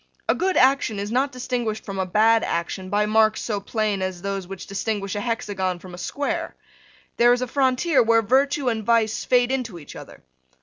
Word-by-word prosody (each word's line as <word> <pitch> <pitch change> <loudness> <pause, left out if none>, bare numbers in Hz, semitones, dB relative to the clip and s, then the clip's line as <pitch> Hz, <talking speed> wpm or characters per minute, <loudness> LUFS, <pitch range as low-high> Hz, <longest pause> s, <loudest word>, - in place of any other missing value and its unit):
A - - +4
good 375 +1 0
action 260 -4 +3
is 200 +1 -4
not 265 +3 +1
distinguished 245 -4 -3
from 195 -1 -5
a 190 - -1
bad 220 +4 +3
action 185 +3 -3
by 205 +2 +1
marks 220 0 +3
so 210 -3 -2
plain 210 -1 -2
as 185 -1 -4
those 195 -2 -3
which 195 -1 -8
distinguish 200 0 -3
a 205 - -3
hexagon 200 -6 -2
from 180 +1 -12
a 175 - -9
square. 330 - -3 0.6
There 240 +1 +6
is 245 +1 0
a - - -3
frontier 265 +3 +2
where 230 -1 +3
virtue 270 +4 +2
and 225 -2 0
vice 225 -1 +1
fade 245 0 +3
into 245 -8 -3
each 150 - -12
other. - - -12
220 Hz, 200 wpm, -23 LUFS, 195-250 Hz, 0.6 s, There